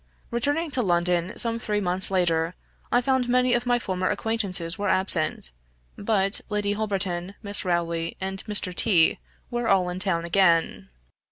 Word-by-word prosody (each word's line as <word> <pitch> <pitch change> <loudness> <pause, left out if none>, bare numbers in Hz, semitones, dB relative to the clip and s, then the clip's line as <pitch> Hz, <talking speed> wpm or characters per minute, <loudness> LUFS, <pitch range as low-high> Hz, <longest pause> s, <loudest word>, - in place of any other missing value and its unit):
Returning 290 +7 0
to 255 - 0
London, 175 -2 0
some 230 -1 -2
three 210 -2 -2
months 185 -1 +5
later, 170 -2 0 0.4
I 245 - +3
found 260 -1 0
many 250 0 +3
of 240 +1 0
my 245 0 +3
former 185 -5 -2
acquaintances 190 -7 -1
were 205 0 -2
absent; 170 - +1 0.4
but 200 -2 0
Lady 205 -1 -1
Holberton, 195 -3 -3
Miss 200 0 -3
Rowley, 170 -2 -2
and 190 0 -5
Mr. 205 -4 +1
T 180 -9 +3 0.3
were 240 -1 -2
all 185 -2 +2
in 180 +1 -5
town 180 -4 +1
again. 170 - +1
195 Hz, 155 wpm, -25 LUFS, 175-225 Hz, 0.4 s, months